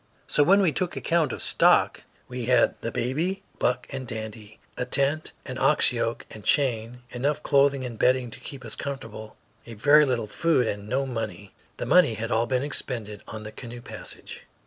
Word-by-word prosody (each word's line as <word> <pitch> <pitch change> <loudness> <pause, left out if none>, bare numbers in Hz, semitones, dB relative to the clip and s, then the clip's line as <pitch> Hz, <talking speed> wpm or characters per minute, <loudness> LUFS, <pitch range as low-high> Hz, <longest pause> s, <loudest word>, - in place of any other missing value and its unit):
So - - +2
when 195 +7 +6
we 170 - +3
took 175 +5 -2
account 165 -2 +1
of - - -4
stock, - - +3 0.3
we 125 -1 -5
had 125 -1 +4
the 115 - -3
baby, 165 - -1 0.2
Buck 125 0 +1
and 130 -2 -5
Dandy, 110 -1 -7 0.2
a - - -2
tent, 140 +5 0
an - - -5
ox - - +4
yoke - - -2
and 110 - -10
chain, 125 -3 +1
enough 145 +5 -1
clothing 140 -2 +3
and 115 -3 -7
bedding 125 -2 +2
to - - -10
keep 135 -3 -8
us 110 - -2
comfortable, 115 -6 -7 0.3
a 115 - -8
very 145 +7 +6
little 125 -4 0
food, 140 +4 +1
and 105 -1 -4
no 135 +3 0
money. 110 -5 -5 0.2
The - - -3
money 180 -11 +5
had 115 +2 -4
all 115 +1 +2
been 130 0 0
expended 115 -7 -2
on 110 -1 -7
the 110 - -7
canoe 120 +1 -9
passage. - - -9
125 Hz, 190 wpm, -26 LUFS, 110-140 Hz, 0.3 s, when